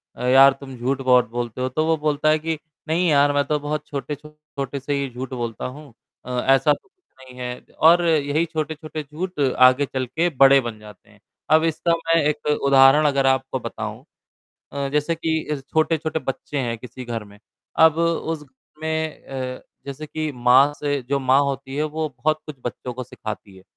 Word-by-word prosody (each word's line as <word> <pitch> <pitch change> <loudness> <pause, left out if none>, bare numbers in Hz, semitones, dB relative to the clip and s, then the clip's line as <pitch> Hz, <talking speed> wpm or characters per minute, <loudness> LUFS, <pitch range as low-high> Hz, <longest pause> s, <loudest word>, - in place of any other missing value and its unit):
अ, - - -7
यार 135 +2 +7
तुम 135 -2 -9
झूठ 130 +3 -1
बहुत 125 -3 +4
बोलते 120 +1 -4
हो, 130 - 0
तो 155 +5 -1
वो 160 0 +2
बोलता 150 0 +1
है 155 0 +3
कि, 160 0 -2 0.3
नहीं 170 +3 +1
यार 145 0 +4
मैं 145 0 +2
तो 150 0 0
बहुत 150 +1 -3
छोटे-छोटे 145 -1 -6
से 145 +2 -3
ही 140 -1 -1
झूठ 130 +1 -6
बोलता 120 -2 -4
हूँ। 140 -1 -9 0.3
अ, - - -9 0.3
ऐसा 140 +3 +3
तो - - -10
कुछ 370 -2 -44 0.2
नहीं 125 -1 -13
है 125 0 -5 0.2
और 170 +2 +6
यही 155 0 +2
छोटे-छोटे 155 -1 -5
झूठ 155 +3 -6
आगे 130 0 +4
चल 130 -1 -3
के 165 +8 0
बड़े 135 -1 +6
बन 115 -3 -6
जाते 105 -2 -15
हैं। - - -21 0.3
अब 160 +1 +6
इसका 165 +1 +1
मैं 165 0 +3
एक 150 0 -1
उदाहरण 140 0 +5
अगर 140 -1 +1
आपको 130 0 0
बताऊँ। - - -6 0.7
अ, 140 -1 -2
जैसे 150 +3 +1
कि 160 -3 -2
छोटे-छोटे 160 0 +1
बच्चे 140 +1 -4
हैं 120 -3 -2
किसी 125 +1 -9
घर 115 -2 -4
में, 100 0 -17 0.4
अब 160 0 +6
उस 165 -2 -1
घर 130 +2 -24
में 160 0 -3
अ, 130 -1 -5 0.2
जैसे 140 +3 -6
कि 155 0 -3
माँ 125 +3 +5
से 145 -2 -2
जो 140 0 +1
माँ 135 +1 +3
होती 135 0 -4
है 150 - 0
वो 155 +1 -2
बहुत 155 +4 -1
कुछ 150 -3 -8
बच्चों 125 +1 -5
को 130 0 -5
सिखाती 105 -3 -8
है। 95 - -15
140 Hz, 195 wpm, -22 LUFS, 130-155 Hz, 0.7 s, यार